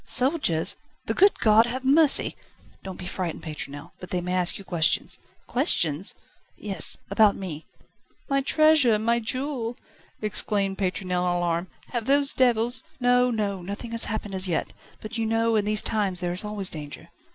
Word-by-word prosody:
"Soldiers! 255 - 0 0.3
The - - -1
good 400 +1 +4
God 220 +1 +5
have 255 +2 -5
mercy!" 285 +2 +6 0.5
"Don't 190 -2 -8
be 180 - -8
frightened, 180 -2 -5
Pétronelle. 145 -2 -7
But 180 - -10
they 180 - -1
may 180 +1 -4
ask 180 -1 +1
you 195 - -10
questions." 170 -4 +1 0.3
"Questions?" 185 - +1 0.4
"Yes; 195 -6 +2
about 205 0 +4
me." 165 -5 -7 0.6
"My 275 -1 +1
treasure, 300 -5 +4
my 230 +2 +1
jewel," 245 0 -4 0.4
exclaimed 200 -2 0
Pétronelle 180 -1 -1
in 175 - 0
alarm, 170 0 -1 0.2
"have 235 -3 -4
those 280 +1 +2
devils 240 -1 +1
...?" 315 - -34
"No, 250 0 +3
no; 205 -5 -2
nothing 200 +6 -7
has 230 0 +2
happened 210 -2 -5
as 190 0 -2
yet, 170 - -2 0.3
but, 230 +2 -6
you 225 - 0
know, 225 0 +1
in 210 -2 +1
these 215 0 +2
times 200 -5 -1
there 175 -1 -3
is 180 - -6
always 210 -2 -5
danger." 150 -2 -9
210 Hz, 170 wpm, -25 LUFS, 180-240 Hz, 0.6 s, mercy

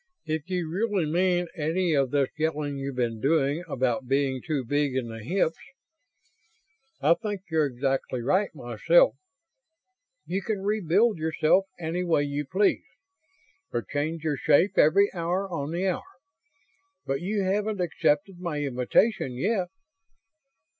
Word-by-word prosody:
If 160 +1 -3
you 180 -3 -1
really 195 +1 0
mean 175 +2 +1
any 165 +2 0
of 135 -3 +2
this 140 -1 +1
yelling 150 -2 -1
you've 135 -1 -4
been 115 -3 -1
doing 145 +2 +1
about 130 -3 -1
being 135 -1 +1
too 150 -6 -2
big 145 +1 0
in 125 -3 -2
the 115 -1 -8
hips 165 - 0 1.4
I 150 +4 +5
think 205 0 -4
you're 155 -2 +3
exactly 135 0 -2
right, 185 - +1
myself - - +3 1.1
you 190 +3 -2
can 200 -1 -3
rebuild 205 0 +2
yourself 160 +4 +2
any 170 +2 -2
way 165 -4 +2
you 145 0 -3
please. 195 +6 +2 0.9
Or 120 - -2
change 150 - -3
your 150 -3 0
shape 155 +8 +3
every 200 +7 +4
hour 180 +2 -1
on 155 -6 -4
the 175 +3 -1
hour. 185 - 0 1.0
But 135 +2 -2
you 200 +2 -1
haven't 205 +2 0
accepted 180 +1 0
my 170 -5 -3
invitation 135 - +1
yet." 185 - 0
160 Hz, 140 wpm, -26 LUFS, 140-185 Hz, 1.4 s, I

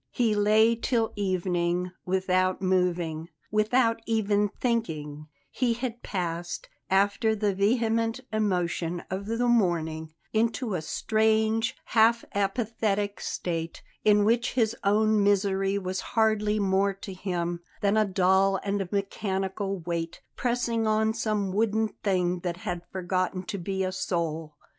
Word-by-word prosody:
He 230 -3 +1
lay 215 +2 +4
till 230 -1 0
evening 180 -2 0 0.2
without 185 0 +1
moving, 175 -3 0 0.2
without 230 +2 +2
even 210 -2 +2
thinking; 155 - -2 0.2
he 245 -2 +1
had 240 -1 -4
passed, 175 -2 -4 0.2
after 205 +3 +2
the 205 -1 0
vehement 225 +3 +1
emotion 180 -4 0
of 195 +2 -3
the 230 +2 0
morning, 160 -8 +1 0.2
into 230 +1 0
a 175 - -1
strange, 220 +5 +1
half 230 +1 +3
apathetic 205 0 -1
state, 165 -2 -4 0.2
in 210 -1 +5
which 235 +2 +2
his 230 -2 +1
own 215 +1 +3
misery 195 -1 +2
was 185 -1 -3 0.2
hardly 215 -1 +3
more 195 0 +2
to 195 0 -8
him 175 -2 -2 0.2
than 200 +1 +2
a 215 - +5
dull 190 0 +3
and 200 -2 -2
mechanical 195 -1 -2
weight, 170 0 -4
pressing 235 -2 0
on 220 0 +2
some 215 -3 -1
wooden 220 +2 +1
thing 180 -3 +1
that 175 -1 -3
had 175 -1 -4
forgotten 185 0 -1
to 200 +1 -5
be 190 +2 -2
a 185 - -1
soul. 165 -4 -3
200 Hz, 130 wpm, -27 LUFS, 180-220 Hz, 0.2 s, in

